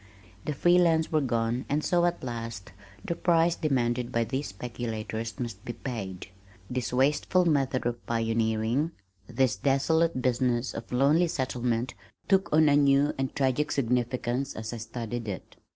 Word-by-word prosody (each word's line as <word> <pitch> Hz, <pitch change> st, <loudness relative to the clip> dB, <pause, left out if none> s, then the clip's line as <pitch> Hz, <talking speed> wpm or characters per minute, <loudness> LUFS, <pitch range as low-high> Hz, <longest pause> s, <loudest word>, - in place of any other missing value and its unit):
The 150 Hz, -, -1 dB
free 175 Hz, +5 st, +4 dB
lands 160 Hz, -2 st, +3 dB
were 155 Hz, -1 st, +3 dB
gone 120 Hz, -1 st, 0 dB
and 150 Hz, +2 st, 0 dB
so, 175 Hz, -1 st, +2 dB
at 175 Hz, 0 st, -1 dB
last, 115 Hz, -6 st, -5 dB, 0.3 s
the -, -, -1 dB
price 170 Hz, -1 st, +3 dB
demanded 125 Hz, -5 st, 0 dB
by 115 Hz, -2 st, +1 dB
these 135 Hz, +5 st, -3 dB
speculators 110 Hz, 0 st, -5 dB
must 115 Hz, -5 st, -5 dB
be 120 Hz, -, -5 dB
paid. 105 Hz, -7 st, -6 dB, 0.4 s
This 125 Hz, -1 st, -2 dB
wasteful 145 Hz, +8 st, +2 dB
method 135 Hz, -6 st, +1 dB
of 120 Hz, 0 st, -2 dB
pioneering, 115 Hz, +5 st, 0 dB, 0.3 s
this 125 Hz, 0 st, +1 dB
desolate 140 Hz, +7 st, +2 dB
business 125 Hz, -1 st, 0 dB
of 115 Hz, -, -7 dB
lonely 145 Hz, +7 st, +4 dB
settlement 125 Hz, -4 st, -1 dB, 0.3 s
took 195 Hz, -1 st, +2 dB
on 155 Hz, 0 st, +5 dB
a 145 Hz, -, +5 dB
new 140 Hz, 0 st, +4 dB
and 135 Hz, -1 st, -2 dB
tragic 135 Hz, +2 st, +1 dB
significance 125 Hz, +1 st, -1 dB
as 110 Hz, +1 st, -5 dB
I -, -, -4 dB
studied 115 Hz, 0 st, -5 dB
it. 95 Hz, -4 st, -6 dB
125 Hz, 150 wpm, -28 LUFS, 115-145 Hz, 0.4 s, on